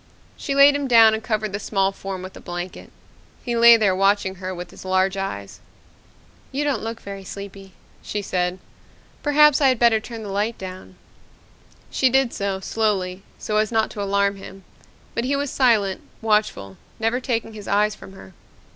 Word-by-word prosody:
She 275 - -4
laid 280 +1 +7
him 285 -1 -2
down 225 -3 +7
and 220 - -2
covered 215 -3 -2
the 200 - -2
small 195 -2 0
form 195 -1 -7
with 185 - -9
a - - -11
blanket. 175 0 -7 0.5
He 240 -1 -2
lay 235 0 +8
there 200 -4 +2
watching 195 0 +2
her 185 0 -4
with 180 -1 -7
his - - -12
large 190 +1 +1
eyes. 100 - -5 0.9
"You 280 +2 -1
don't 290 -2 0
look 225 +1 -5
very 195 -1 -8
sleepy," 195 0 -9 0.3
she 205 -1 -4
said. 180 -1 -1 0.6
"Perhaps 300 0 +5
I 275 - +5
had 255 -2 +3
better 230 -1 +4
turn 225 0 -8
the 205 - -7
light 205 +4 -1
down." 185 0 -9 1.0
She 260 - +3
did 265 -1 +2
so, 200 -1 -2
slowly, 195 -3 -1 0.2
so 210 - -2
as 215 +1 +1
not 220 -1 +1
to 205 - -6
alarm 200 0 +1
him. 195 0 -11 0.5
But 235 - -2
he 280 +2 0
was 280 -1 -2
silent, 220 -7 +2 0.2
watchful, 210 - 0 0.2
never 225 +2 0
taking 230 -3 -3
his 210 -2 -10
eyes 210 +1 +2
from 190 - -13
her. 95 - -14
210 Hz, 180 wpm, -22 LUFS, 190-235 Hz, 1.0 s, lay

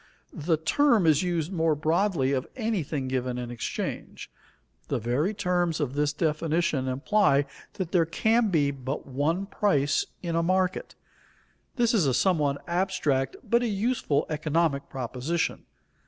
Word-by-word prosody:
The 160 +2 0
term 225 - +3
is 155 -3 +4
used 175 -2 -1
more 165 -4 +1
broadly 160 -2 +1
of 130 -2 -1
anything 175 - -2
given 130 -1 -2
in 120 -1 -5
exchange. 120 -2 -5 0.6
The - - -1
very 125 - 0
terms 180 -5 0
of 140 -4 -1
this 145 0 +1
definition 155 -2 0
imply 140 +2 +2 0.3
that 185 -5 -4
there 170 -3 +3
can 220 +6 +2
be 145 -6 +2
but 135 0 -5
one 150 +8 -1
price 145 -9 +1 0.2
in 170 -2 -2
a 165 - +2
market. 185 +2 0 0.8
This 240 -3 +2
is 190 -10 +3
a 130 - +2
somewhat 145 -4 +1
abstract 170 -7 0
but 235 0 +2
a 245 - 0
useful 205 - 0
economic 155 -1 0
proposition. 135 +6 -3
160 Hz, 140 wpm, -27 LUFS, 140-185 Hz, 0.8 s, is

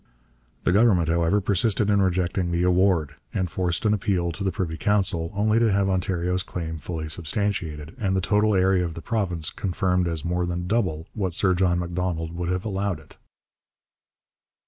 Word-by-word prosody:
The - - +2
Government, 95 -5 +4
however, 85 +4 +2
persisted 100 +1 +1
in 100 -1 +3
rejecting 90 -1 0
the 85 0 0
award, 90 -5 +2 0.2
and 95 - 0
forced 90 +3 -2
an 105 - +4
appeal 95 -5 0
to 100 +5 -5
the 95 - +1
Privy 85 -2 -3
Council, 85 -3 +1
only 110 +2 +2
to 115 -2 +3
have 100 0 +2
Ontario's 90 -1 0
claim 80 -4 -5
fully 80 -1 -5
substantiated, 80 -2 -3
and 95 -3 0
the - - +2
total 105 +3 +2
area 95 -1 +3
of 85 -2 -4
the 85 - -8
province 90 -9 -1
confirmed 90 -1 0
as 80 -2 -2
more 90 +1 0
than 90 0 -3
double 90 -6 0
what 95 -5 -2
Sir 95 +2 +2
John 90 -1 +2
Macdonald 85 -1 -2
would 85 0 -3
have 90 +2 -2
allowed 100 -2 -2
it. - - -18
90 Hz, 175 wpm, -24 LUFS, 85-100 Hz, 0.2 s, Government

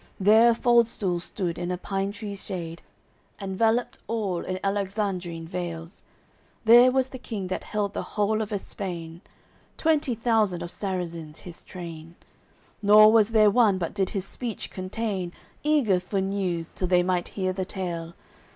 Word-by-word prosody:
There 220 +4 +6
a 235 - +3
fald 235 -1 +4
stool 185 -6 -2
stood 175 -1 -4
in 175 - -3
a 180 - -1
pine 195 +2 -2
tree's 205 -1 -7
shade, 170 -4 -6 0.6
Enveloped 220 +5 0
all 200 -6 -2
in 185 - -3
Alexandrin 195 -4 -2
veils; 170 0 -6 0.6
There 240 +3 +8
was 260 0 +1
the 260 - -8
King 205 -6 -5
that 185 - -3
held 205 -1 -2
the - - -2 0.2
whole 215 +1 +2
of 215 0 -4
Espain, 175 -4 -5 0.6
Twenty 305 -6 +2
thousand 215 -6 +1
of 175 - -6
Sarrazins 170 -5 -4
his 175 -2 -11
train; 165 -2 -9 0.7
Nor 215 +1 +8
was 220 -1 +5
there 215 -2 +5
one 210 -4 +4
but 170 -3 -3
did 195 -2 0
his 195 -3 -3
speech 230 +1 -6
contain, 190 -1 -3 0.3
Eager 280 -11 +3
for 190 +2 -2
news, 190 -4 -2
till 185 - -2
they 180 0 +4
might 180 -1 0
hear 185 -1 0
the 190 0 -2
tale. 170 -3 -5
195 Hz, 160 wpm, -26 LUFS, 180-220 Hz, 0.7 s, There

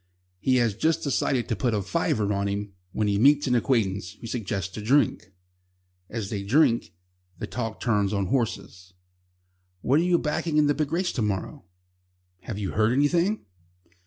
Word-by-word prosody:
He 130 +7 +2
has 120 -4 +2
just 160 +10 0
decided 135 -3 0
to 115 - -1
put 120 +1 0
"a 105 - 0
fiver" 100 +2 0
on 100 0 -1
him 100 0 -3 0.2
when 105 - -1
he 100 0 +1
meets 145 +4 +5
an 125 - +1
acquaintance, 105 -7 0
who 110 - -13
suggests 100 -6 -3
a - - -4
drink. 115 -5 +1 0.8
As 110 -4 -4
they 100 -3 -2
drink, 120 - +2 0.4
the - - -4
talk 115 -3 -4
turns 105 -4 +1
on 100 -2 0
horses. 95 -5 -3 0.9
"What 140 +9 +3
are - - +2
you 175 -1 +3
backing 155 0 -1
in 150 - +5
the 145 - +3
big 150 0 -2
race 175 +2 0
to 120 - -3
morrow?" 100 -3 -3 0.7
"Have 100 +3 -6
you 100 -2 -3
heard 110 +2 +2
anything?" 170 +9 +1
115 Hz, 175 wpm, -26 LUFS, 100-140 Hz, 0.9 s, meets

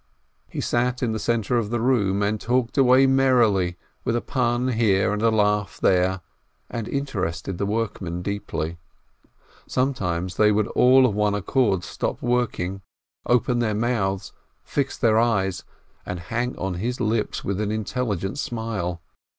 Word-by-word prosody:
He - - -4
sat 125 +1 0
in 120 - +1
the 110 - -2
centre 115 +1 0
of 105 -3 -3
the 120 +1 -1
room, 105 -5 +2
and 105 +1 -1
talked 120 0 0
away 130 -1 +6
merrily, 120 -10 +3 0.3
with 115 - 0
a 120 - 0
pun 125 0 0
here 105 -5 +2
and 105 - -2
a 115 - +4
laugh 105 -2 +1
there, 95 0 +2 0.5
and 115 -2 -4
inter 140 -8 -3
ested 85 +2 -6
the 100 - 0
workmen 100 -5 -3
deeply. 85 -4 -4 0.9
Sometimes 95 -9 -1
they 105 0 +5
would 105 0 +2
all 130 +1 +5
of 120 - +1
one 105 0 +1
accord 105 -2 +1
stop - - -3
working, 115 -6 -1 0.5
open 120 0 +2
their 110 -3 0
mouths, 100 -4 -1 0.3
fix 140 -1 -2
their 110 -3 +3
eyes, 95 -6 0 0.4
and 90 -1 -5
hang 120 +8 -3
on 95 -1 -2
his 125 +3 -2
lips 110 -2 -1
with 100 +1 -2
an 105 - -1
intelligent 110 - -2
smile. 105 -9 -3
110 Hz, 155 wpm, -24 LUFS, 95-120 Hz, 0.9 s, away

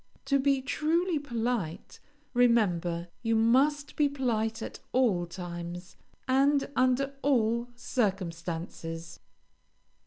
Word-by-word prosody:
To 275 -1 +2
be 270 -1 +2
truly 325 +4 +1
polite, 235 - -3 0.3
remember 180 -9 +2
you 225 -1 +1
must 270 +6 +3
be 295 -1 +3
polite 225 -5 -1
at - - -7
all 210 -9 +2
times, 175 +1 -7 0.3
and 275 +2 +3
under 255 +2 +2
all 235 -3 +2
circumstances. 170 -7 -3
235 Hz, 95 wpm, -29 LUFS, 175-270 Hz, 0.3 s, must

